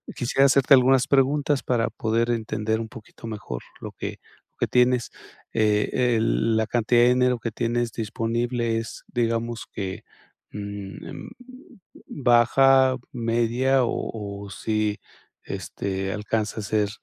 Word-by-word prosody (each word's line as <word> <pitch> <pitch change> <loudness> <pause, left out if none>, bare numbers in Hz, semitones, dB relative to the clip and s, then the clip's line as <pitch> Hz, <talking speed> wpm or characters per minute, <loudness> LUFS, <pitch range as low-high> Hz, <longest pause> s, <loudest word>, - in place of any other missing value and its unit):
Quisiera 135 +2 +2
hacerte 140 +1 +5
algunas 130 -1 +5
preguntas 140 +1 +2
para 115 -2 +1
poder 115 +1 0
entender 110 -1 -1
un 110 - -5
poquito 115 0 -12
mejor, 105 - -6 0.2
lo - - -6
que - - -6 0.3
lo - - -49
que - - +1
tienes, 125 -1 +2 0.4
eh, 110 +3 +2
el 115 0 +1
La 110 - +2
cantidad 120 0 +2
de 120 - +6
dinero 125 -1 +2
que 115 +1 -4
tienes 120 0 -1
disponible, 115 +1 -1
¿es 115 - -8
digamos 115 0 -2
que, 95 -2 -5 0.5
mm, 100 -1 -7
em, - - -8 0.8
baja, 130 +1 +4 0.2
media? 120 +3 +1
O 100 -3 -4
o - - -10
si, 105 +2 -1 0.4
este, 95 0 -4
¿alcanza 110 +1 -2
a - - -7
ser, 105 +1 0
115 Hz, 135 wpm, -24 LUFS, 110-125 Hz, 0.8 s, de